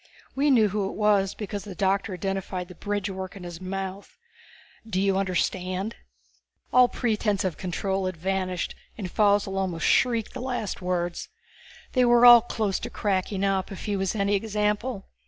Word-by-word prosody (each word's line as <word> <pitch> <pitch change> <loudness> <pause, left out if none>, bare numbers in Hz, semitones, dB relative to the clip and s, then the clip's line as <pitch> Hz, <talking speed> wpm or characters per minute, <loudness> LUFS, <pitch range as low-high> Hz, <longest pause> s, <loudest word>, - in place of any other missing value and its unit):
We 285 +2 +2
knew 225 -6 +5
who 200 -1 -1
it - - -8
was 205 -2 +2
because 205 -2 -5
the 195 -2 -8
doctor 195 +1 0
identified 190 -1 -3
the - - -9
bridgework 195 -1 -4
in 195 - -9
his 175 0 -8
mouth. 195 +1 -5 0.7
Do 220 -4 -2
you 195 0 +2
understand?" 185 +1 -1 0.8
All 250 0 +7
pretense 215 -4 0
of 185 -4 -1
control 190 +1 -2
had 185 -2 -4
vanished, 185 0 -2 0.2
and 190 -5 -5
Faussel 205 -2 +2
almost 180 -4 -2
shrieked 235 -4 +2
the 255 - -6
last 245 -7 -3
words. 175 - -2 0.6
They 255 - +4
were 240 0 +6
all 240 -1 +10
close 215 -4 -2
to - - -5
cracking 195 -1 -1
up, 195 -1 0
if 195 - -7
he 205 - -1
was 195 +1 -1
any 200 -1 +1
example. 210 +2 -1
195 Hz, 165 wpm, -26 LUFS, 185-215 Hz, 0.8 s, all